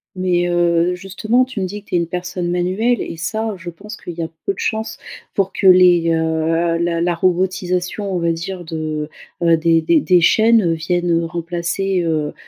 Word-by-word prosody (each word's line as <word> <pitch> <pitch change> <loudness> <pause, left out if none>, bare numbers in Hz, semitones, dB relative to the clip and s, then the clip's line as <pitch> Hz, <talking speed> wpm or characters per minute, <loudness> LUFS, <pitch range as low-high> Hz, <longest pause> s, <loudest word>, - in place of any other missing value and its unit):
Mais, 180 -1 +1
heu, 175 0 +2
justement, 215 +7 0
tu 255 -5 -7
me - - 0
dis 205 +2 -7
que - - -25
tu - - -1
es - - +4
une 170 - 0
personne 180 0 -4
manuelle 185 +7 0
et 165 - -6
ça, 220 +7 -2
je 175 0 -8
pense 210 +5 -10
qu'il 175 - -8
y 170 - -2
a - - -3 0.2
peu 200 - 0
de - - -19
chances 220 0 -2 0.4
pour 195 -1 0
que 195 - +1
les, 180 -2 +6
heu, 165 +1 0
la 170 -1 0
la 175 0 +1
robotisation 185 +2 -1
on 185 - -1
va 170 0 +1
dire 175 +2 -5
de, 155 -2 -4 0.3
heu, 165 -1 +4
des 165 0 +3
des 315 - +3
des 180 -7 +4
chaînes, 225 +4 +4
heu, 170 - +1
viennent 170 +1 0
remplacer, 170 +3 -2
heu 155 -3 -1
175 Hz, 200 wpm, -18 LUFS, 165-190 Hz, 0.4 s, les